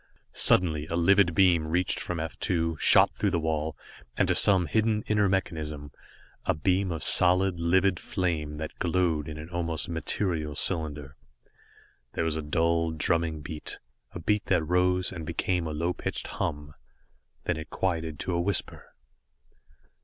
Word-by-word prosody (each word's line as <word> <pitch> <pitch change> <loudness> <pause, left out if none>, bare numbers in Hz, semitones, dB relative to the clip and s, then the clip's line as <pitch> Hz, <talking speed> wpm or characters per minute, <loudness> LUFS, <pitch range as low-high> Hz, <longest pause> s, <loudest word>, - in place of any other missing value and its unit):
Suddenly, 80 -4 +3
a 85 - -3
livid 90 0 +3
beam 90 -5 +4
reached 90 +3 0
from 90 -2 -4
F 80 0 -5
2, 85 -2 0
shot - - +5
through 105 - -1
the 90 -2 0
wall, 80 -1 -2 0.4
and - - +2
to - - +4
some 95 -3 +4
hidden 110 +2 0
inner 105 -2 +2
mechanism 75 -6 -3 0.5
a - - 0
beam 95 +4 0
of 80 - -4
solid, 90 0 +4
livid 95 +2 +2
flame 80 -6 -3
that 80 0 -7
glowed 85 -4 0
in 75 -1 -7
an 75 +1 -8
almost 85 -2 -2
material 80 -2 -2
cylinder. 75 -5 +1 1.0
There - - -1
was 80 -1 -1
a 80 - -3
dull, 85 +2 0
drumming 80 0 -1
beat, 75 0 -6 0.3
a - - -7
beat 105 +5 -1
that 90 -4 +2
rose, 90 +2 +1
and 90 -4 -7
became 85 +2 -2
a - - -4
low 85 +4 -1
pitched - - -4
hum. 75 0 -4 0.7
Then - - -1
it 80 - -8
quieted 80 -4 -2
to 90 - -3
a 85 - 0
whisper. 95 0 -2
85 Hz, 160 wpm, -27 LUFS, 80-90 Hz, 1.0 s, shot